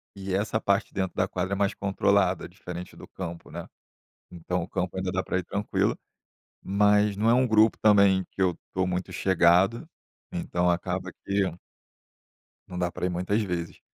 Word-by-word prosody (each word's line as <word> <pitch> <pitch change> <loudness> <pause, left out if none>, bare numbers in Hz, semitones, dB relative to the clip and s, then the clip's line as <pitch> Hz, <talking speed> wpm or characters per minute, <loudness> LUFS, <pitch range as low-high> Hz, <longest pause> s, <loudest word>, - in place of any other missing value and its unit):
e 95 -1 -5
essa 105 +3 0
parte 100 -2 +1
de - - -28
dentro 95 -2 -2
da 95 - +1
quadra 95 +1 -3
é - - +1
mais 100 0 +1
controlada, 100 -2 +1
diferente 90 0 -8
do - - -12
campo, 85 -3 -8
né. - - -7 0.6
Então 90 +1 -3
o 85 - -6
campo 90 0 -3
ainda 95 0 -2
dá 95 - 0
pra 95 - -1
ir 90 - -4
tranquilo, 100 +3 -1 0.7
mas 105 +1 +3
não 110 +2 +2
é - - +6
um 130 +1 +3
grupo 110 -1 +4
também 100 -3 +5
que - - -5
eu 90 -3 +2 0.2
tô 95 0 +1
muito 90 0 -3
chegado, 95 - +3 0.5
então 90 - 0
acaba 90 +1 -2
que 100 0 +1 1.3
não 90 - -6
dá 90 0 0
pra - - -5
ir - - -1
muitas 90 +5 0
vezes. 85 -4 -4
95 Hz, 180 wpm, -27 LUFS, 90-100 Hz, 1.3 s, é